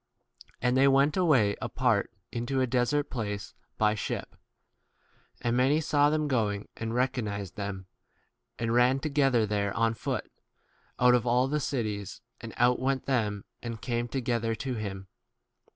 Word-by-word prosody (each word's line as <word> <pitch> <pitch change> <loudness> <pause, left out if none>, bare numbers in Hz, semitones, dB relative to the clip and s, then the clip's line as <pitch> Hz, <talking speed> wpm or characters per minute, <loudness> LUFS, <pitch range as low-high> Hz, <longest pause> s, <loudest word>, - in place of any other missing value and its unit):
And 125 0 +2
they 135 +1 +5
went 140 +2 +4
away 135 - +3
apart - - +1 0.2
into 120 +3 -2
a 130 - +3
desert 130 +4 0
place 105 -5 -4 0.2
by 105 -1 +3
33 105 - -3
ship. - - -4 1.1
And 120 0 0
many 135 +5 +3
saw 145 -2 +3
them 155 0 0
going, 105 -6 0
and 115 0 -4
recognized 110 -7 -1
them, 100 -2 -5 0.7
v - - -5
and 115 0 0
ran 125 +2 +4
to 155 - -2
gether 135 -6 +3
there 100 -1 -1
on 115 0 +2
foot, 110 - -4 0.7
out 125 0 +6
of 125 0 +2
all 125 +2 +3
the 150 +2 0
cities, 105 -8 -3 0.2
and 115 - -8
outwent 130 +2 +2
them 105 -7 -1 0.2
[and 120 -1 -4
34 - - -13
came 120 -2 -1
together 115 -2 -1
to 130 +4 -4
him]. 100 -4 -5
120 Hz, 160 wpm, -29 LUFS, 110-135 Hz, 1.1 s, out